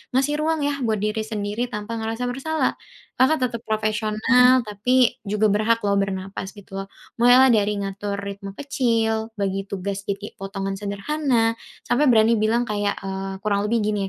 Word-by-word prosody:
ngasih 275 +3 +2
ruang 315 0 0
ya 285 -1 -1
buat 220 -2 +1
diri 215 +1 -1
sendiri 215 +2 -3
tanpa 210 +1 -4
ngerasa 225 +2 -3
bersalah, 310 +5 -1 0.4
Kakak 285 +4 +4
tetap 235 -2 -6
profesional, 220 +4 +3
tapi 245 +4 +2
juga 210 +1 +2
berhak 220 +3 +2
loh 200 -1 +2
bernapas 190 0 -3
gitu 195 -1 -8
loh. 195 - -14 0.3
Mulailah 250 +2 +7
dari 210 -2 +2
ngatur 200 +1 -4
ritme 200 0 -6
kecil, 230 -5 0
bagi 195 0 -1
tugas 200 0 -4
jadi 200 +1 -4
potongan 195 0 -4
sederhana, 225 +3 0 0.4
sampe 285 +5 +3
berani 225 0 +5
bilang 225 +3 +2
kayak, 205 -1 -1
eee, 195 0 -4
kurang 205 -1 +1
lebih 235 0 +2
gini 205 -2 0
215 Hz, 160 wpm, -23 LUFS, 200-245 Hz, 0.4 s, Mulailah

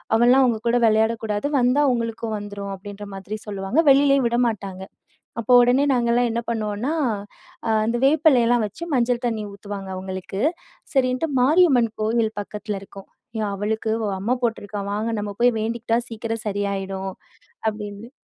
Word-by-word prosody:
அவன்லாம் 250 +3 +5
உங்க 230 -2 +1
கூட 235 - +3
விளையாடக் 220 +1 +2
கூடாது. 210 +4 -1
வந்தா 250 +4 +3
உங்களுக்கும் 230 -1 -3
வந்துரும்" 205 -1 -6
அப்டின்ற 205 +2 -9
மாதிரி 195 +3 -6
சொல்லுவாங்க. 200 +7 -1
வெளியிலயும் 275 -2 +4
விடமாட்டாங்க. 215 -6 -1 0.6
அப்போ 240 +2 +2
உடனே 250 +4 +4
நாங்கலாம் 240 0 +2
என்ன 235 +1 -1
பண்ணுவோம்னா, 220 +4 -2 0.8
அ - - 0 0.2
அந்த 230 +2 0
வேப்பலைலாம் 260 -6 +4
வச்சு, 210 - -10
மஞ்சள் 245 0 +1
தண்ணி 220 -2 -2
ஊத்துவாங்க 200 -1 -7
அவங்களுக்கு. 190 +1 -6 0.6
சரின்ட்டு, 255 +3 +2
மாரியம்மன் 275 -5 +4
கோவில் 220 0 +1
பக்கத்துலருக்கும். 200 -1 -7 0.3
"எ - - 0
அவளுக்கு 220 +2 -2
வ - - -1
அம்ம 230 +7 0
போட்ருக்கான், 205 -3 -2
வாங்க 215 +2 -1
நம்ம 205 0 -3
போய் 245 0 +6
வேண்டிக்ட்டா 230 +1 -1
சீக்கிரம் 225 0 -4
சரியாயிடும்" 195 -1 -3 0.6
அப்டின்னு 210 +1 -8
225 Hz, 140 wpm, -23 LUFS, 205-245 Hz, 0.8 s, போய்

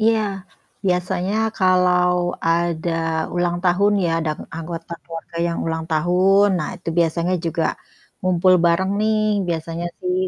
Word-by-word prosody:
Iya 220 0 +3 0.7
biasanya 180 +2 0 0.2
kalau 180 -2 +3 0.4
ada 170 0 0 0.4
ulang 175 0 0
tahun 200 +3 +3
ya - - 0 0.2
dang 155 -1 -2 0.2
anggota 165 +1 -6
keluarga 165 0 -9
yang 170 0 -2
ulang 160 0 -2
tahun, 180 +5 +3
nah 155 - -2
itu 175 - -8
biasanya 170 +2 +1
juga 165 0 -1 0.6
ngumpul 185 0 +3
bareng 170 +3 +2
nih 215 0 +2 0.3
biasanya 165 +1 -3
sih 365 0 -1
175 Hz, 130 wpm, -21 LUFS, 165-185 Hz, 0.7 s, Iya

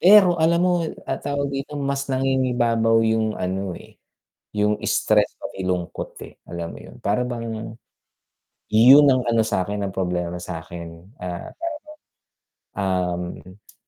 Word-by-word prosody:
Pero 185 -3 +7
alam 170 +2 +4
mo 180 - +3 0.3
ah, 135 - -3
tawag 140 -1 -2
dito 140 +2 -4
mas 140 0 -2
nangingibabaw 125 -4 +2
yung 110 -1 +1
ano, 95 0 -3
eh, - - -15 0.6
yung 105 0 +1
stress - - +2
pati 95 - -7
lungkot, 90 -1 -3
eh, - - -14
alam 85 -1 -5
mo - - -9
yun. - - -13
Para 105 +3 +1
bang, 115 -2 -5 1.0
yun 130 +7 +8
ang 130 -1 +4
ano 115 -1 +3
sa'kin 100 0 -1
ang 95 - -3
problema 90 -2 -1
sa'kin, 85 0 -8
ah, 90 -1 -5
tawag 335 0 -4 1.7
dun, 95 0 -14
um, 105 - -25
110 Hz, 140 wpm, -23 LUFS, 90-135 Hz, 1.7 s, yun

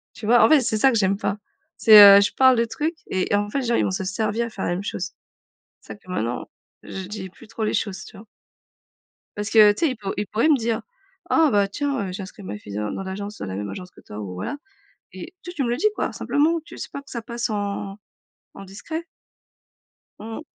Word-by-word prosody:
Tu 220 - -8
vois? 240 +2 +5
En - - +6
fait, 310 -2 +6
c'est 230 -3 -1
ça 265 +5 +5
que 235 - -1
j'aime 195 -1 +2
pas. 200 0 -2 0.4
C'est, 215 -1 +8 0.2
heu, - - +6
je 200 - +1
parle 260 -1 +5
de 230 - +2
trucs 305 +8 -3
et 185 +1 0
en 205 0 +1
fait, 275 - -1
les 255 - -4
gens, 235 - +1
ils - - +2
vont - - 0
se 190 0 -3
servir 215 +4 -1
et - - -8
faire 200 - -5
la - - -1
même 180 +2 -3
chose. 185 -2 -4 0.7
C'est - - -10
pour 205 - -20
ça - - -26
que - - -11
maintenant, 120 -9 -3 0.3
je 190 -1 -7
dis 190 -2 -7
plus 230 +6 -17
trop 225 0 -4
les 215 - -1
choses, 195 -3 -2
tu - - -14
vois? 205 +3 -13 1.1
Parce 210 +1 -4
que, 215 -2 +7
tu 205 - -2
sais - - +1
ils - - -9
pour 200 -3 -5
ils 205 - -2
pourraient 225 +9 +1
me 305 - +5
dire: 230 -2 -2 0.5
«Ah 320 -2 +4
bah, 200 -1 +3
tiens, 270 -2 -2
heu, 180 - -6
j'ai 195 - -6
inscrit 195 +2 -11
ma 105 - -6
fille 100 -1 -10
dans 105 0 -2
dans - - -5
l'agence 200 +2 -6
dans - - -5
la 95 - -5
même 100 +1 -4
agence 180 - -8
que - - -18
toi» 105 - -10
ou 95 -3 -6
voilà, 90 - -4 0.6
et 190 - -10
juste 355 0 -8
tu 275 - 0
me - - -1
le 240 - 0
dis 425 - +1
quoi, - - -2
simplement 320 +3 +1
tu - - -13
s - - -7
pas, 280 - -7
que 280 - -18
ça 235 - -5
passe 235 0 -4
en 200 -1 -4 0.6
en 195 - -10
discret. 315 - -7 1.1
Mmh 225 +1 -7
mh. - - -7
210 Hz, 265 wpm, -23 LUFS, 190-240 Hz, 1.1 s, C'est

